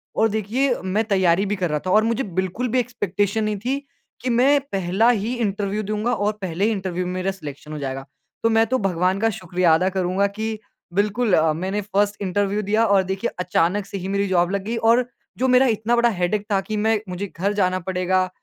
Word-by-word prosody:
और 225 +1 +3
देखिए 225 +5 0
मैं 200 +4 0
तैयारी 190 -2 +2
भी 205 +1 -1
कर 180 -3 -1
रहा 150 0 0
था 185 - 0
और 215 +3 +5
मुझे 230 +3 0
बिल्कुल 190 +7 -1
भी - - +4
एक्सपेक्टेशन 205 -3 -1
नहीं 215 -1 -1
थी 270 +2 +1 0.4
कि 255 - -2
मैं 265 +4 +4
पहला 195 +5 +2
ही 230 +1 0
इंटरव्यू 205 -2 -1
दूँगा 215 +4 -1
और 210 -1 +1
पहले 185 +1 -1
ही 225 - +2
इंटरव्यू 185 -3 -2
में 180 - -3
मेरा 185 +1 -1
सिलेक्शन 150 -4 -9
हो 150 - -4
जाएगा। 135 -1 -4 0.4
तो 230 - +4
मैं 225 0 +4
तो 260 +3 +1
भगवान 185 0 +1
का 225 - +2
शुक्रिया 180 -2 +2
अदा 180 +4 +3
करूँगा 190 +1 0
कि 220 +1 -4 0.3
बिल्कुल 205 +2 +1
अ, 160 -1 +4
मैंने 190 +5 -2
फर्स्ट 205 +1 0
इंटरव्यू 200 +2 0
दिया 215 +3 +2
और 200 -3 +4
देखिए 190 +5 -2
अचानक 180 +2 +1
से 200 - -6
ही 185 0 -5
मेरी 200 0 0
जॉब 175 0 +2
लग 200 -1 -1
गयी 230 +2 -3
और 245 +1 +3 0.3
जो 260 - +1
मेरा 255 +1 +5
इतना 225 +1 +1
बड़ा 235 0 +4
हेडेक 200 +1 -1
था 195 - +3
कि 215 +2 -4
मैं 220 +1 +2
मुझे 185 +3 -4
घर 200 +4 0
जाना 185 -2 +1
पड़ेगा। 185 0 +1
200 Hz, 220 wpm, -22 LUFS, 185-220 Hz, 0.4 s, और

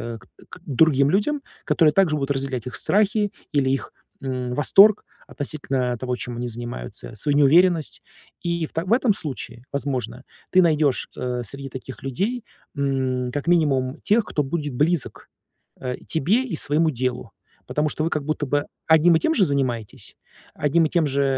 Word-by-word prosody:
э, - - -8
к 95 - -21 0.2
к - - -11
другим 140 0 +3
людям, 210 - +1 0.2
которые 155 -3 +3
также 170 -3 +3
будут 140 -2 -2
разделять 135 -4 -2
их 125 - -6
страхи 205 0 +1 0.2
или 140 -3 +2
их, 135 - -2 0.3
м, 130 -2 -3
восторг 195 +10 +5 0.2
относительно 135 -4 -3
того, 125 +1 -2
чем 120 -1 -5
они 120 +1 -3
занимаются, 120 - -7
свою 145 +7 0
неуверенность. 165 +3 +4 0.4
И 170 -1 -1
в - - -22
та 165 - -1
в 185 - -5
этом 245 -3 +3
случае, 125 -8 -6
возможно, 135 -2 -3 0.3
ты 185 - +6
найдешь, 155 -5 +2
э, 125 -1 -2
среди 135 +4 -7
таких 130 -2 -9
людей, 200 - -2 0.3
м, 130 -3 -1
как 145 +2 -3
минимум 140 -6 +2
тех, 215 +1 +3
кто 150 - -1
будет 145 0 -3
близок, 155 +2 0 0.5
а, 125 -1 -3
тебе 185 - +2
и 225 - -4
своему 155 +3 +2
делу. 125 -1 -3 0.4
Потому 150 +1 0
что 155 - -2
вы 165 - +1
как 150 -4 -2
будто 155 0 -1
бы 145 +1 0 0.2
одним 160 +1 +6
и - - +3
тем 320 - +1
же 205 -11 +4
занимаетесь, 130 - -3 0.4
одним 150 +3 +2
и - - -1
тем 165 -2 +2
же, 140 0 +1
145 Hz, 175 wpm, -23 LUFS, 130-170 Hz, 0.5 s, ты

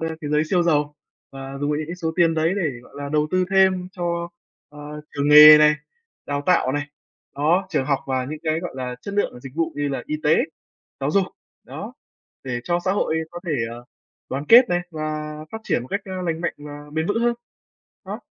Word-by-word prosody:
a, 165 - -2
cái 145 -3 -5
giới 150 0 +3
siêu 180 -2 +3
giàu 150 -3 +1 0.4
và 135 0 -8
dùng 145 - 0
vào 150 - 0
những 155 - -4
cái 175 - -5
số 160 -2 -3
tiền 170 -2 +4
đấy 160 +2 +1
để, 175 -7 0
gọi - - -19
là, 145 0 -5
đầu 150 +1 +1
tư 185 0 +2
thêm 190 -1 +3
cho, 170 -2 -3 0.4
ờ, 150 0 -9
trường 145 0 0
nghề 150 +1 +11
này, 150 0 +6 0.5
đào 145 0 -2
tạo 170 -8 +3
này, 145 0 -2 0.5
đó, 165 +7 +2
trường 150 -5 0
học 140 -1 +1
và 130 -1 -1
những 150 +4 -6
cái, 160 0 0
gọi 175 - -5
là, 125 -1 -4
chất 200 - -7
lượng 205 - +1
và 125 - -11
dịch 130 0 -10
vụ 165 -1 0
như 145 0 -1
là 135 - -3
y 155 - -2
tế, 155 0 +4 0.6
giáo 140 +2 0
dục, 195 +2 +3 0.4
đó, - - -8 0.5
để 120 -2 -3
cho 175 0 +1
xã 190 - +2
hội 160 -5 0
có 175 - -8
thể, 165 - -1 0.2
ờ, 120 +1 -9 0.4
đoàn 135 +2 -3
kết 245 +2 +8
này 175 0 +1
và 155 -1 -4 0.2
phát 220 - -4
triển 125 - 0
một 125 - -11
cách, 200 - -1
a, 185 -1 -5
lành 165 -2 -2
mạnh 175 - -2
và 145 0 -10
bền 160 +1 -1
vững 205 +4 0
hơn. 240 0 +2 0.7
Đó. - - -6
155 Hz, 230 wpm, -22 LUFS, 145-175 Hz, 0.7 s, nghề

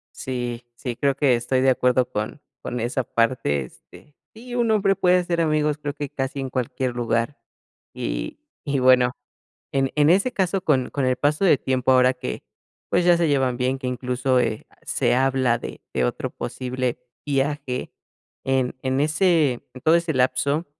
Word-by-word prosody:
Sí, 120 -2 -4
sí, 120 0 -5
creo 140 +1 +1
que 140 -2 +3
estoy 130 +2 0
de 130 0 +4
acuerdo 125 0 +2
con 105 +7 -4 0.2
con 125 - -4
esa 120 +3 -1
parte, 115 - 0
este, 145 - -17 0.2
sí, 240 +2 -9
un 235 -2 +2
hombre 195 -2 +2
puede 180 -1 +4
hacer 175 -1 -1
amigos, 150 -2 +1
creo 145 -1 -4
que 145 -1 -4
casi 135 +1 -3
en 135 -1 -4
cualquier 125 0 -2
lugar, 115 +2 -1 0.6
y - - -4 0.2
y 140 -1 0
bueno, 125 -1 +5 0.6
en 135 -1 +1
en 150 +1 +5
ese 200 +8 +3
caso 195 -3 0
con 135 -7 +1
con 140 - -1
el 130 0 +2
paso 150 +6 +1
de 175 - +6
tiempo 130 0 +1
ahora 130 0 +5
que, 125 0 -5 0.5
pues, 175 - +2
ya 175 -1 +5
se 170 -1 +1
llevan 135 -3 +1
bien, 130 +2 0
que 130 - -5
incluso, 125 +1 0
eh, 110 -3 -2 0.2
se - - +1
habla 130 -2 +2
de - - -8
de 65 - +1
otro - - -2
posible 125 -1 -3 0.3
viaje 140 -2 -2 0.5
en 130 -1 0
en 130 +1 0
ese 155 -2 +3 0.2
en 130 - -10
todo 160 +1 +4
ese 170 -1 0
lapso, 130 +5 +1
130 Hz, 175 wpm, -23 LUFS, 125-150 Hz, 0.6 s, de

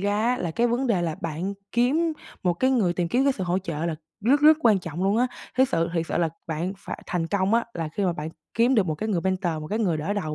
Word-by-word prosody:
ra 210 +5 +1
là 170 - -1
cái 235 +9 +1
vấn 245 +3 0
đề 195 -7 +2
là 165 -2 -1
bạn 170 +5 -3 0.2
kiếm 300 +8 +2 0.3
một 180 -1 +2
cái 260 +9 +2
người 205 -9 +2
tìm 175 -1 -1
kiếm 255 +8 +2
cái 275 - +4
sự 190 -7 -4
hỗ 180 +2 +1
trợ 170 -3 -3
là 165 - -1 0.3
rất 270 +7 +3
rất 305 +1 +7
quan 215 -7 +5
trọng 175 0 -5
luôn 200 +3 +2
á. 245 - +3 0.3
Thiết 260 0 +4
sự 165 0 +1
thiệt 165 -1 0
sự - - -1
là 170 -2 +2 0.2
bạn 165 +4 -2
phải - - -7
thành 170 -3 -1
công 200 +3 +1
á, 235 - +3
là 165 -2 -3
khi 195 +6 -2
mà 180 - +2
bạn 155 -1 -5 0.3
kiếm 240 +3 +4
được 205 -5 +3
một 155 - -1
cái 215 +8 -4
người 180 -5 +1
mentor, 185 -2 0
một 155 - -6
cái 215 - -1
người 180 -8 +1
đỡ 155 +7 -2
đầu 155 -7 -2
190 Hz, 285 wpm, -25 LUFS, 170-235 Hz, 0.3 s, rất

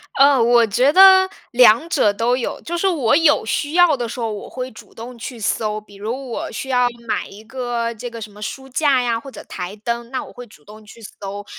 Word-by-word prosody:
呃， 275 -2 +5
我 235 0 +4
觉 250 +7 +2
得 380 +2 +7 0.2
两 245 +5 +5
者 210 - +2
都 230 +4 0
有。 245 - -4
就 345 +1 -4
是 390 - +1
我 280 -10 +2
有 300 -7 +3
需 290 +7 -2
要 350 -4 +5
的 240 -3 -4
时 240 - -7
候， 225 -2 -2
我 205 - -7
会 255 0 -6
主 215 - -15
动 235 +2 -10
去 240 0 -8
搜， 215 0 -1
比 205 -1 -18
如 240 +5 -6
我 - - -5
需 265 - -6
要 250 -1 +3 0.2
买 - - -2
一 210 +2 -13
个 235 -1 -3
这 240 +2 -7
个 230 - -9
什 210 -1 -8
么 210 - -15
书 265 +5 -6
架 270 -1 +2
呀， 230 -1 -1
或 275 - -11
者 - - -11
台 180 +3 -7
灯， 235 +2 -4
那 260 - -4
我 - - -13
会 245 0 -11
主 150 -8 -20
动 215 +1 -14
去 225 +2 -15
搜。 205 -1 -8
240 Hz, 255 characters per minute, -19 LUFS, 220-265 Hz, 0.2 s, 得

